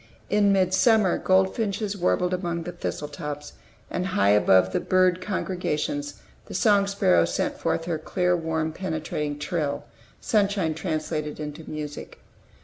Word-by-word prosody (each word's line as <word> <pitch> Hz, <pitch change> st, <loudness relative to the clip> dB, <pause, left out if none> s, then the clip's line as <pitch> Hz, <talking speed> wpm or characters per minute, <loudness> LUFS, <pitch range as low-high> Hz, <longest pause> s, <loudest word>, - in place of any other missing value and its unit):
In 205 Hz, -1 st, +4 dB
midsummer, 190 Hz, +1 st, +3 dB
goldfinches 195 Hz, +2 st, +1 dB
warbled 180 Hz, -1 st, +1 dB
among 170 Hz, -2 st, -2 dB
the 175 Hz, -, -5 dB
thistle 170 Hz, -3 st, -4 dB
tops; 150 Hz, -1 st, -6 dB, 0.3 s
and, 180 Hz, +1 st, -2 dB
high 100 Hz, -, +3 dB
above 95 Hz, -2 st, +4 dB
the -, -, +2 dB
bird 185 Hz, -1 st, +2 dB
congregations, 195 Hz, -, -2 dB, 0.3 s
the -, -, -7 dB
song 205 Hz, -3 st, +4 dB
sparrow 90 Hz, -, +3 dB
sent 85 Hz, -, -2 dB
forth 165 Hz, -, -1 dB
her 165 Hz, -2 st, -2 dB
clear, 180 Hz, +2 st, +1 dB
warm, 160 Hz, -1 st, -2 dB
penetrating 155 Hz, -4 st, -3 dB
trill, 150 Hz, -2 st, -2 dB, 0.4 s
sunshine 200 Hz, -6 st, +1 dB
translated 155 Hz, -2 st, -3 dB
into 150 Hz, +1 st, -7 dB
music. 150 Hz, -1 st, -6 dB
175 Hz, 135 wpm, -25 LUFS, 150-190 Hz, 0.4 s, In